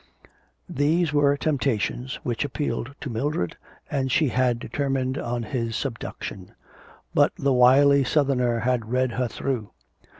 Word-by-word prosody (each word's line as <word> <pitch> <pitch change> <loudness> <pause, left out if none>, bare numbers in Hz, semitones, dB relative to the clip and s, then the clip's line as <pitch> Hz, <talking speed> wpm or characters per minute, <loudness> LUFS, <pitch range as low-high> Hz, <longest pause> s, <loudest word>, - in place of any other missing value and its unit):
These 155 +3 +1
were 145 -1 +3
temptations 130 - -1
which 120 -2 -1
appealed 140 -2 -3
to 145 - -4
Mildred 115 - -2 0.3
and 135 -3 -1
she 150 +1 +3
had 125 -1 +1
determined 135 0 -2
on 120 0 -3
his 115 0 -3
subduction. 115 -7 -5 0.6
But - - +4
the 140 -1 +1
wily 135 +3 +6
Southerner 125 -4 +1
had 120 -2 0
read 130 0 +1
her 125 +1 -1
through. 115 -3 -3
130 Hz, 130 wpm, -25 LUFS, 120-140 Hz, 0.6 s, wily